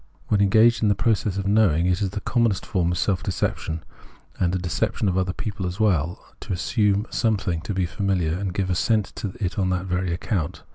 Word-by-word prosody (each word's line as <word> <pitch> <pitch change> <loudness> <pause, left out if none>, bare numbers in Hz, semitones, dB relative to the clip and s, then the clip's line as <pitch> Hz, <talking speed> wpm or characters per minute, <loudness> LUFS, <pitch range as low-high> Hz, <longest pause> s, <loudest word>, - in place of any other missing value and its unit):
When 105 -1 +3
engaged 110 +4 +5
in 110 - +3
the 100 - +3
process 105 -2 0
of 100 - -2
knowing, 100 -6 +3
it 90 +2 +1
is 100 - +1
the 100 +2 -5
commonest 115 -4 +1
form 90 -6 0
of 90 - -1
self 95 -3 0
deception, 80 -3 -2 0.6
and 90 0 +1
a - - +1
deception 90 +3 -1
of 90 - +1
other 95 -1 +1
people 100 0 -4
as 90 +4 -5
well, 90 -6 +1
to - - -7
assume 100 +2 +1
something 100 -7 0
to 100 - -4
be 95 -1 +1
famihar, 90 -2 0
and 100 -2 -2
give 95 +1 -1
assent 105 +4 +1
to 100 -3 -4
it 95 -1 -2
on 95 -1 +1
that 90 0 -1
very 90 -1 -1
account. 85 -1 -2
95 Hz, 210 wpm, -24 LUFS, 90-105 Hz, 0.6 s, engaged